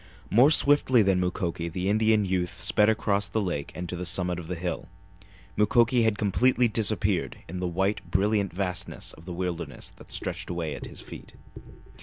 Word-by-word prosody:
More 125 +7 +6
swiftly 145 -6 +5
than 95 -2 +2
Mukoki 90 -2 -2
the 90 +3 -3
Indian 110 0 +3
youth 90 -2 -2
sped 105 +3 +3
across 100 -3 +1
the 105 +4 -2
lake 90 -8 -3
and 90 0 -5
to 90 - -5
the 90 - -5
summit 90 0 0
of 85 - -9
the 90 - -3
hill. 85 0 -4 0.7
Mukoki 115 +3 +3
had 110 -2 +1
completely 120 +5 +2
disappeared 105 -4 0
in 90 +2 -6
the 90 - -2
white, 95 +4 -1
brilliant 100 0 +1
vastness 90 -1 -3
of 80 - -15
the 90 - -6
wilderness 85 -6 -5
that - - -15
stretched - - -2
away 85 -4 -3
at - - -7
his - - -10
feet. - - -12
95 Hz, 180 wpm, -26 LUFS, 90-105 Hz, 0.7 s, More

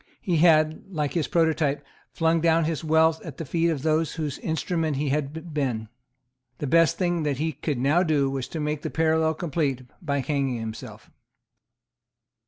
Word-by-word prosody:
He 180 -6 0
had, 155 -1 +4
like 150 -5 -2
his 165 -4 0
prototype, 155 -4 +1 0.2
flung 165 0 +1
down 165 0 +3
his 160 0 -2
wealth 160 0 +3
at 155 -6 -8
the 165 - -5
feet 165 +4 +1
of 150 -5 -2
those 155 -1 +1
whose 150 -5 -3
instrument 160 -2 -1
he 145 0 -1
had 150 +3 -3
been. 125 -7 -2 0.7
The - - -4
best 165 +3 +3
thing 175 -2 0
that 145 -3 -1
he 160 +3 -1
could 150 0 -3
now 140 +8 +3
do 155 -6 +2
was 135 -2 -3
to 160 - -6
make 150 0 -2
the - - -3
parallel 160 0 +1
complete 145 -6 -1 0.2
by 140 -4 -1
hanging 135 -3 -1
himself. 110 0 -8
155 Hz, 175 wpm, -25 LUFS, 140-165 Hz, 0.7 s, had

